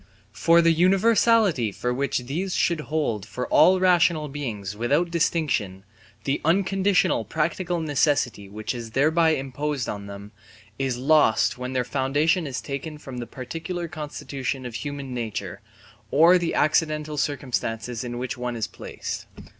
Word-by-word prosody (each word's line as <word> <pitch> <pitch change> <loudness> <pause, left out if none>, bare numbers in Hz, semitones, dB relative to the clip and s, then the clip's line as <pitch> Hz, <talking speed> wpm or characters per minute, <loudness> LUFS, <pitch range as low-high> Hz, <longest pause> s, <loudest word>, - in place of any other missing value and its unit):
For 170 +8 +4
the 165 - +5
universality 195 - +3 0.2
with 125 0 +1
which 140 +1 0
these 175 +8 -2
should 170 -2 +1
hold 145 -10 -1
for 125 +5 -5
all 185 +1 +6
rational 170 -4 +3
beings 110 -9 -5
without 145 +10 +1
distinction, 150 - 0 0.4
the 135 +4 -1
unconditional 190 - +2
practical 170 - -1
necessity 140 -9 0
which 110 +4 -4
is 115 -2 -7
thereby 160 +3 +4
imposed 135 0 -3
on 100 -1 -5
them, 100 +1 -9 0.5
is 135 -2 -1
lost 135 -3 +3
when 125 +1 -4
their 130 -1 +1
foundation 145 +6 +1
is 130 -2 -4
taken 150 +2 -5
from 130 -4 -8
the 120 - -5
particular 165 +7 -5
constitution 140 -4 -5
of 120 - -6
human 140 +1 -5
nature, 115 -4 -4 0.5
or 170 +5 +6
the 170 -1 -2
accidental 155 0 +1
circumstances 125 -4 -2
in 120 -1 -5
which 125 0 -4
it 125 -1 -3
is 110 -2 -1
placed. 95 - -7
145 Hz, 145 wpm, -24 LUFS, 125-165 Hz, 0.5 s, all